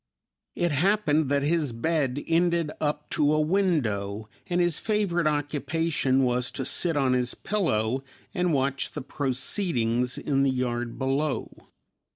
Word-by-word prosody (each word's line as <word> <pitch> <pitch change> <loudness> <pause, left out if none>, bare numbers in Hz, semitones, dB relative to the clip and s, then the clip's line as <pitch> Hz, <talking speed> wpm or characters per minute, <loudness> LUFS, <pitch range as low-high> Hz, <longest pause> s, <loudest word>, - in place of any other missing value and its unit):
It 175 -1 0
happened 160 -2 +2
that 140 0 +1
his 150 -4 +1
bed 145 +1 -1
ended 170 -1 +1
up 150 -1 -1
to 150 +1 +2
a - - +2
window, 125 - 0 0.2
and 175 -1 0
his 175 -3 +2
favorite 200 -7 0
occupation 145 -1 0
was 125 0 +1
to 135 - -3
sit 165 +3 +1
on 135 -2 +2
his 125 -1 +1
pillow 130 - 0 0.3
and 180 -1 +1
watch 140 -1 0
the 145 - -5
proceedings 130 - 0
in 135 -2 0
the 140 - +3
yard 120 -2 -2
below. 135 +2 -1
145 Hz, 140 wpm, -26 LUFS, 130-165 Hz, 0.3 s, the